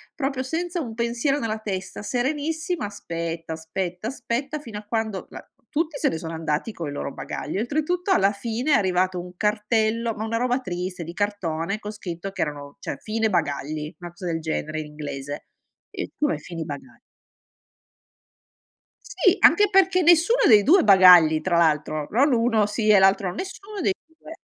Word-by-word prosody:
proprio 270 -2 -2
senza 335 +6 -3
un 230 -6 -6
pensiero 235 +4 0
nella 220 -2 -2
testa, 195 -3 -5
serenissima, 295 - -2
aspetta, 165 -4 -5
aspetta, 175 +4 -4
aspetta 270 +3 -3
fino 230 -7 -8
a - - -12
quando 215 -3 -3
la - - -10 0.3
tutti 310 -1 -1
se - - +2
ne 160 - -3
sono 165 0 -6
andati 160 +5 -2
coi 165 -6 -5
loro 140 -1 -5
bagagli, 155 +7 -4
oltretutto, 310 - -1
alla 200 - +4
fine 230 +7 -2
è - - +6
arrivato 185 -2 +1
un 180 0 -12
cartello 220 +2 0
ma 215 - -4
una 230 +1 -1
roba 250 +2 +1
triste, 180 -3 -4
di 170 - -8
cartone, 195 -3 -2
con 210 -1 -7
scritto 195 -2 -6
che - - -5
erano 145 -2 -4
cioè, - - -5
"fine 220 0 -1
bagagli", 150 -3 -2
'na 175 -1 -7
cosa 175 +2 -10
del 165 -2 -1
genere 155 -1 -3
in 155 - -5
inglese. 145 -1 -6 0.5
E: - - -5
"Come, 295 -1 0
fini 165 -2 -6
bagagl"? 145 - -9 2.0
Sì, - - +2
anche 415 -1 +6
perché 380 -1 +4
nessuno 345 +9 +5
dei 215 -3 +8
2 350 - +5
bagagli, 180 -5 +8
tra 175 -2 +1
l'altro, 155 -2 +1
non 270 +5 +3
1 230 -2 +3
sì, 215 +1 -1
e 210 -2 +7
l'altro 190 -1 +3
nessuno 395 - -7
dei 390 - +2
2. 320 0 -13
210 Hz, 170 wpm, -24 LUFS, 170-260 Hz, 2.0 s, dei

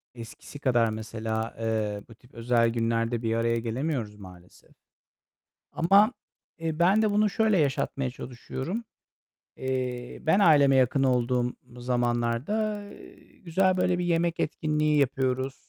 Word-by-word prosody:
eskisi 115 +4 -10
kadar, 120 -5 +2
mesela, 110 +1 -4
eee, 110 -2 -2
bu 115 - -13
tip 125 +3 -24
özel 115 0 +2
günlerde 115 0 -1
bir 115 -1 -1
araya 115 0 +1
gelemiyoruz 115 -2 -3
maalesef. 90 -3 -15 1.0
Ama, 200 +8 +4 0.5
eee, 160 -1 -3
ben 190 +5 +4
de 215 - +2
bunu 210 +1 +2
şöyle 215 -1 +2
yaşatmaya 135 -2 -1
çalışıyorum. 130 - -6 0.7
Eee, 125 -2 -4
ben 175 +6 +3
aileme 145 -6 +5
yakın 130 +1 +2
olduğum 125 -1 +1 0.2
zamanlarda, 125 - -1 0.6
güzel 185 +2 +2
böyle 180 -1 +1
bir 180 - -1
yemek 170 -1 0
etkinliği 150 -1 0
yapıyoruz. 130 -1 -1
130 Hz, 120 wpm, -27 LUFS, 115-165 Hz, 1.0 s, aileme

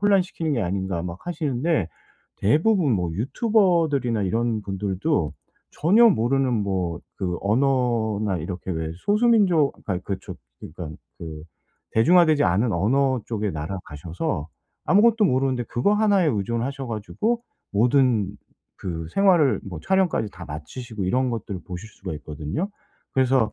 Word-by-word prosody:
혼란시키는 185 -6 +1
게 120 -6 0
아닌가.' 95 -1 -2
막 85 0 -6
하시는데 155 - 0 0.5
대부분 155 - +3
뭐 90 -5 0
유튜버들이나 155 - +1
이런 115 +2 0
분들도 95 - -1 0.4
전혀 205 +10 +5
모르는 135 - +2
뭐 95 -5 -1 0.2
그 90 -2 -1
언어나 110 -4 +1
이렇게 90 +3 -5
왜 80 -1 -3
소수 210 - +2
민족 180 -11 +4
아니 95 -3 -2
그 95 0 -3
저 95 - -8 0.2
그러니까는 80 -1 -8 0.2
그 80 -2 -7 0.5
대중화되지 155 +5 +5
않은 105 +4 +2
언어 130 +8 +2
쪽의 105 -3 -2
나라 80 +5 -4
가셔서 80 - -4 0.4
아무것도 215 +5 +5
모르는데 130 -4 +1
그거 125 - +1
1 205 -4 +3
에 - - +2
의존하셔 120 +3 -2
가지고 165 - -2 0.3
모든 120 0 +3 0.5
그 80 -3 -5
생활을 180 -8 +4
뭐 90 -5 -7
촬영까지 185 - +1
다 90 - -9
마치시고 100 - -6
이런 125 +7 +1
것들을 100 -5 -4
보실 90 +4 -7
수가 95 -4 -7
있거든요. 75 - -4 0.4
그래서 130 -3 +2
115 Hz, 315 characters per minute, -24 LUFS, 95-155 Hz, 0.5 s, 전혀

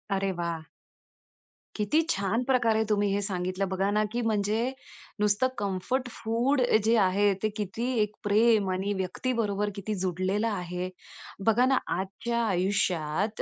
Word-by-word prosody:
अरे 195 0 0
वाह! 165 -2 -3 1.1
किती 215 +10 +2
छान 200 +5 0
प्रकारे 235 -4 +2
तुम्ही 205 -1 +2
हे 205 - 0
सांगितलं 185 0 -2
बघा 190 +1 0
ना, 210 +1 +2
की 240 +1 -1
म्हणजे 220 +3 0 0.5
नुसतं 210 +4 +3
कम्फर्ट 205 +6 -1
फूड 235 +5 0 0.2
जे 225 +2 +4
आहे 200 +1 +3
ते 215 - +2
किती 210 +4 -3
एक 210 0 +1
प्रेम 210 -1 +3
आणि 195 +2 -1
व्यक्तीबरोबर 205 +1 -1
किती 205 +2 -4
जोडलेलं 185 +4 0
आहे. 180 -3 -3 0.6
बघा 230 +3 +4
ना 265 0 +3 0.2
आजच्या 215 +6 -2
आयुष्यात 185 -1 0
205 Hz, 135 wpm, -28 LUFS, 190-225 Hz, 1.1 s, जे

